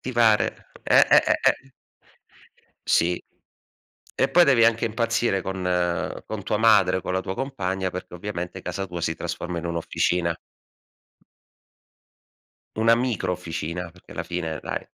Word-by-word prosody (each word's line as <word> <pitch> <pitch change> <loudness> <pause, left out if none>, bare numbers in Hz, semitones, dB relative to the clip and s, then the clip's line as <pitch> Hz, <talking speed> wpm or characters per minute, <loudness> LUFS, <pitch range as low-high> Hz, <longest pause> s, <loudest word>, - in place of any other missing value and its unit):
Ti 130 - -5
pare. 110 -3 +2
Eh, - - +5
eh, - - +7
eh, - - +3
eh. 135 0 -2 1.2
Sì. 85 +1 +2 1.0
E - - +3
poi 175 0 +6
devi 130 -6 +5
anche 115 0 +3
impazzire 115 -3 0
con 95 -1 -4 0.6
con 110 -2 -5
tua 105 - 0
madre, 105 -4 +4
o - - -5
con 90 - -3
la 95 - 0
tua 95 - -5
compagna, 95 -8 -2
perché 90 0 -7
ovviamente 90 0 -5
casa 95 +2 -4
tua 90 -1 -6
si 80 - 0
trasforma 90 -1 -4
in 85 - -5
un'officina. 85 0 0 2.4
Una 115 +1 +5
micro 120 -6 -1
officina, 85 0 -5
perché 90 +1 -16
alla - - -4
fine 85 -3 -4
dai. - - -4
95 Hz, 145 wpm, -24 LUFS, 90-115 Hz, 2.4 s, eh